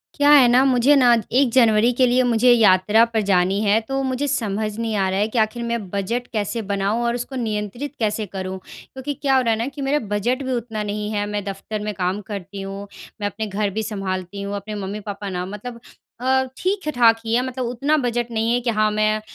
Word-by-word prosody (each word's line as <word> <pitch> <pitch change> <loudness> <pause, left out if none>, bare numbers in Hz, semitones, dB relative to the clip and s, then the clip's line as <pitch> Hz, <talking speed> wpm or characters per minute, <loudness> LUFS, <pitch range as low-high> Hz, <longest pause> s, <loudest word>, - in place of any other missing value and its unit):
क्या 290 -1 +3
है 275 -4 +8
ना 250 +2 +5
मुझे 260 +2 +4
ना 250 -3 +5 0.3
1 275 -3 +3
जनवरी 230 -2 +4
के 255 +1 +3
लिए 250 +1 +3
मुझे 245 0 +4
यात्रा 210 -1 +5
पर 230 -2 -1
जानी 195 -1 +2
है, 210 +1 +3
तो 270 +4 -3
मुझे 260 +2 -1
समझ 215 -5 -2
नहीं 225 -2 -2
आ 195 -2 +1
रहा 190 +1 -1
है 210 - +2
कि 225 - -5
आखिर 220 +2 0
मैं 235 -5 -3
बजट 215 +6 -2
कैसे 215 +2 -2
बनाऊँ 200 +4 0
और 235 0 0
उसको 245 +2 -5
नियंत्रित 230 +4 -4
कैसे 215 -1 -1
करूँ? 190 -1 -5 0.4
क्योंकि 265 +2 -4
क्या 270 0 0
हो 260 - +4
रहा 235 -2 +1
है - - -1
ना 230 - -1
कि 280 +1 -7
मेरा 275 +2 +1 0.2
बजट 245 +6 0
भी 260 - -3
उतना 225 -3 -3
नहीं 210 0 -3
है 205 -1 -1
मैं 205 0 -3
दफ़्तर 200 +2 -5
में 210 0 -3
काम 185 +1 -2
करती 200 0 -6
हूँ, 195 +1 -7 0.3
मैं 205 - 0
अपने 215 +2 -4
घर 205 +1 -1
भी 220 +3 -3
सँभालती 195 -2 -4
हूँ, 200 +1 -4
अपने 205 +2 -6
मम्मी-पापा 205 0 -5
ना 180 -1 -3
मतलब 210 +5 -8 0.4
अ, 260 +1 +2
ठीक-ठाक 305 - +2
ही 225 - -1
हैं 245 - +3
मतलब 255 0 -4
उतना 250 +6 0
बजट 240 0 -1
नहीं 225 +1 0
है 245 - +2
कि 240 - -1
हाँ 215 0 +4
मैं 215 0 +2
अ, - - -8
220 Hz, 230 wpm, -21 LUFS, 205-245 Hz, 0.4 s, है